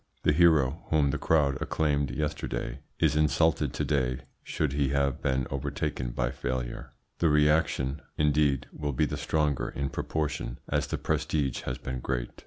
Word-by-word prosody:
The -, -, +4 dB
hero 80 Hz, -2 st, +4 dB
whom 75 Hz, -3 st, +3 dB
the 75 Hz, -, -2 dB
crowd 75 Hz, -3 st, +2 dB
acclaimed 70 Hz, -3 st, +1 dB
yesterday 75 Hz, -2 st, -3 dB, 0.2 s
is 75 Hz, -3 st, +2 dB
insulted 75 Hz, -1 st, +2 dB
to -, -, -1 dB
day 65 Hz, -3 st, 0 dB, 0.2 s
should 75 Hz, -3 st, -1 dB
he 70 Hz, -1 st, +1 dB
have 70 Hz, -1 st, 0 dB
been 65 Hz, -2 st, +1 dB
overtaken 70 Hz, -1 st, -2 dB
by 60 Hz, +1 st, -1 dB
failure. 60 Hz, -1 st, -4 dB, 0.3 s
The 85 Hz, -, +3 dB
reaction, 75 Hz, -2 st, +2 dB, 0.2 s
indeed, 75 Hz, -3 st, +2 dB
will 75 Hz, -2 st, -3 dB
be 75 Hz, +5 st, +2 dB
the 70 Hz, -, -3 dB
stronger 75 Hz, -3 st, 0 dB
in 70 Hz, 0 st, -3 dB
proportion 75 Hz, -5 st, -2 dB
as -, -, 0 dB
the -, -, -2 dB
prestige 70 Hz, -5 st, -1 dB
has 65 Hz, +1 st, -2 dB
been 65 Hz, 0 st, -5 dB
great. -, -, -2 dB
70 Hz, 160 wpm, -28 LUFS, 65-75 Hz, 0.3 s, The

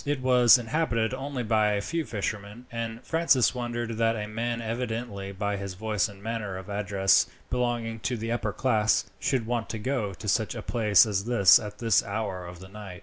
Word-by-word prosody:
It 145 Hz, -1 st, -1 dB
was 125 Hz, -1 st, +6 dB
inhabited 115 Hz, -2 st, -1 dB
only 135 Hz, -1 st, -4 dB
by 110 Hz, -2 st, +2 dB
a 100 Hz, -, 0 dB
few 165 Hz, +8 st, -2 dB
fishermen; 105 Hz, +2 st, -5 dB
and 115 Hz, 0 st, -5 dB
Francis 160 Hz, -9 st, +3 dB
wondered 120 Hz, -2 st, -4 dB
that 115 Hz, 0 st, +2 dB
a 105 Hz, -1 st, -4 dB
man, 115 Hz, +2 st, -3 dB
evidently 115 Hz, -3 st, -4 dB
by 100 Hz, +1 st, -2 dB
his 100 Hz, -1 st, -6 dB
voice 105 Hz, +1 st, -1 dB
and 100 Hz, -1 st, -14 dB
manner 110 Hz, -4 st, -3 dB
of 95 Hz, +2 st, -8 dB
address 100 Hz, -1 st, +2 dB, 0.2 s
belonging 120 Hz, -2 st, -1 dB
to 125 Hz, +2 st, -2 dB
the 115 Hz, +1 st, -4 dB
upper 115 Hz, -3 st, -1 dB
class, 110 Hz, +1 st, +1 dB
should 130 Hz, -5 st, 0 dB
want 120 Hz, -1 st, -2 dB
to 110 Hz, -, -4 dB
go 110 Hz, -4 st, -2 dB
to 105 Hz, -, -9 dB
such 110 Hz, +2 st, 0 dB
a -, -, -6 dB
place 105 Hz, -5 st, +4 dB
as 100 Hz, -2 st, -2 dB
this 115 Hz, -7 st, +6 dB
at 105 Hz, -1 st, -8 dB
this 115 Hz, -2 st, +3 dB
hour 100 Hz, -4 st, -4 dB
of 90 Hz, 0 st, -9 dB
the 95 Hz, -, -11 dB
night. 95 Hz, -3 st, -9 dB
110 Hz, 200 wpm, -27 LUFS, 100-120 Hz, 0.2 s, was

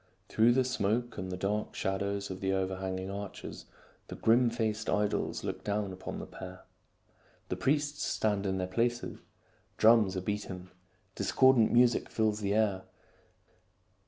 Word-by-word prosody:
Through 115 Hz, +2 st, +4 dB
the 130 Hz, +1 st, +3 dB
smoke 120 Hz, -1 st, -1 dB
and 95 Hz, 0 st, -4 dB
the 90 Hz, -, -3 dB
dark 105 Hz, +3 st, -2 dB
shadows 100 Hz, +1 st, -2 dB
of 95 Hz, -, -6 dB
the 95 Hz, 0 st, 0 dB
overhang 95 Hz, 0 st, -2 dB
ing 95 Hz, +1 st, -5 dB
arches, 100 Hz, -1 st, -7 dB, 0.4 s
the -, -, -7 dB
grim 120 Hz, +2 st, +4 dB
faced 110 Hz, -2 st, -2 dB
idols 105 Hz, 0 st, 0 dB
look -, -, -4 dB
down 100 Hz, -2 st, -1 dB
upon 95 Hz, -, -6 dB
the -, -, -6 dB
pair. -, -, -10 dB, 0.9 s
The -, -, -1 dB
priests 145 Hz, +1 st, 0 dB
stand 105 Hz, -2 st, 0 dB
in 95 Hz, 0 st, 0 dB
their 95 Hz, -, -1 dB
places. 120 Hz, +6 st, -1 dB, 0.6 s
Drums 110 Hz, -4 st, +5 dB
are -, -, -1 dB
beaten. 95 Hz, -2 st, -4 dB, 0.4 s
Discordant 130 Hz, -1 st, +4 dB
music 120 Hz, 0 st, +4 dB
fills 110 Hz, -1 st, 0 dB
the 100 Hz, -1 st, 0 dB
air. 105 Hz, -4 st, +2 dB
105 Hz, 150 wpm, -31 LUFS, 95-115 Hz, 0.9 s, Drums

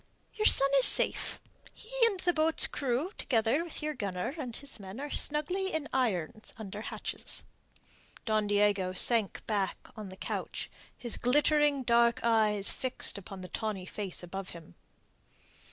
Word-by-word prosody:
"Your 430 Hz, 0 st, +2 dB
son 275 Hz, 0 st, +5 dB
is 260 Hz, -, +9 dB
safe; -, -, +4 dB, 0.4 s
he 445 Hz, -, -14 dB, 0.2 s
and 400 Hz, -5 st, -3 dB
the 350 Hz, -, +1 dB
boat's 320 Hz, 0 st, +4 dB
crew 275 Hz, +6 st, -2 dB
together 235 Hz, +6 st, +1 dB
with 335 Hz, -3 st, -8 dB
your 305 Hz, 0 st, -2 dB
gunner 200 Hz, -2 st, -4 dB
and 255 Hz, -8 st, -6 dB
his 275 Hz, -5 st, -8 dB
men 195 Hz, +4 st, -9 dB
are 290 Hz, +1 st, -6 dB
snugly 360 Hz, +6 st, -1 dB
in 315 Hz, -2 st, -3 dB
irons 215 Hz, -5 st, -2 dB
under 210 Hz, -1 st, -7 dB
hatches." -, -, -2 dB, 0.8 s
Don 215 Hz, -2 st, +1 dB
Diego 205 Hz, -2 st, +1 dB
sank 220 Hz, +1 st, +1 dB
back 200 Hz, -3 st, -3 dB
on 210 Hz, -3 st, -8 dB
the 185 Hz, -, -10 dB
couch, -, -, -5 dB, 0.3 s
his 240 Hz, -2 st, -5 dB
glittering 295 Hz, +2 st, +2 dB
dark 235 Hz, 0 st, +3 dB
eyes 215 Hz, -3 st, +2 dB
fixed 255 Hz, -5 st, -1 dB
upon 195 Hz, 0 st, -10 dB
the 185 Hz, -, -8 dB
tawny 215 Hz, -5 st, -4 dB
face 190 Hz, -2 st, -3 dB
above 190 Hz, +2 st, -7 dB
him. 165 Hz, -2 st, -15 dB
230 Hz, 155 wpm, -30 LUFS, 200-290 Hz, 0.8 s, is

